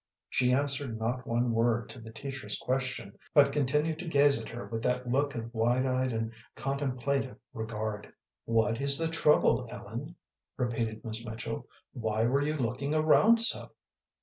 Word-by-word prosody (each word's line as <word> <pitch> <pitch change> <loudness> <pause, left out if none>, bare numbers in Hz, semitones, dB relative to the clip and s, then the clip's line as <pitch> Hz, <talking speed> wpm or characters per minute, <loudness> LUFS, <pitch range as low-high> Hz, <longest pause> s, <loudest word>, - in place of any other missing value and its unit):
She 125 -1 +2
answered 140 -3 0
not 120 +3 -2
one 120 +1 +1
word 115 +1 +2
to - - -8
the 115 -1 -10
teacher's 130 +3 -5
question, 130 -6 -3 0.2
but 140 -1 +7
continued 150 +3 +1
to 175 - -6
gaze 140 -5 +4
at - - -8
her 120 +1 -6
with 115 -1 -4
that 125 +1 0
look 140 +3 +1
of 115 0 -5
wide 120 +3 +2
eyed 130 0 +1
and 115 0 -2 0.2
contemplative 135 -1 -1 0.2
regard. 110 -2 -4 0.3
"What 115 +1 +1
is 140 0 +6
the 165 0 +1
trouble, 150 -5 +3
Ellen?" 120 +14 -7 0.4
repeated 115 -3 -2
Miss 110 0 -3
Mitchell. 110 -1 -5 0.3
"Why 110 -1 0
were 135 +4 +2
you 150 +2 0
looking 130 +4 -1
around 210 +9 +5
so?" 230 - 0
125 Hz, 160 wpm, -30 LUFS, 115-140 Hz, 0.4 s, but